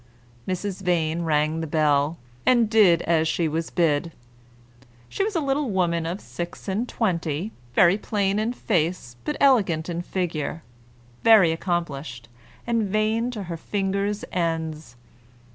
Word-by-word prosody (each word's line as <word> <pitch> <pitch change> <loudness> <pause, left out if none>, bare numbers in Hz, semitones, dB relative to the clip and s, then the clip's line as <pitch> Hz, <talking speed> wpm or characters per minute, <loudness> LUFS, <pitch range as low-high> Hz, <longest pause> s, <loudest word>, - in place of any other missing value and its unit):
Mrs. 190 +1 -3
Vane 170 -3 0
rang 155 0 +1
the 160 - -3
bell, 150 0 +2 0.3
and 240 -3 +4
did 190 -7 +5
as 160 -1 +2
she 165 +1 0
was 160 +2 -2
bid. 165 -1 +1 1.0
She 390 - -2
was 420 -1 -2
a - - +3
little 280 -2 0
woman 170 -4 0
of 175 +4 -3
six 175 +3 -7
and 210 +6 -1
twenty, 175 -3 -1 0.2
very 180 +3 +5
plain 200 -1 0
in 225 +3 -1
face, 170 - -1
but 300 - -3
elegant 195 - +3
in 170 0 -2
figure, 165 -4 -3 0.6
very 215 -7 +7
accomplished, 150 -9 -3 0.4
and 235 -1 +1
vain 215 +3 +1
to 220 -5 -5
her 170 -2 -5
fingers' 200 +3 -2
ends. 160 -6 -2
175 Hz, 140 wpm, -24 LUFS, 160-210 Hz, 1.0 s, very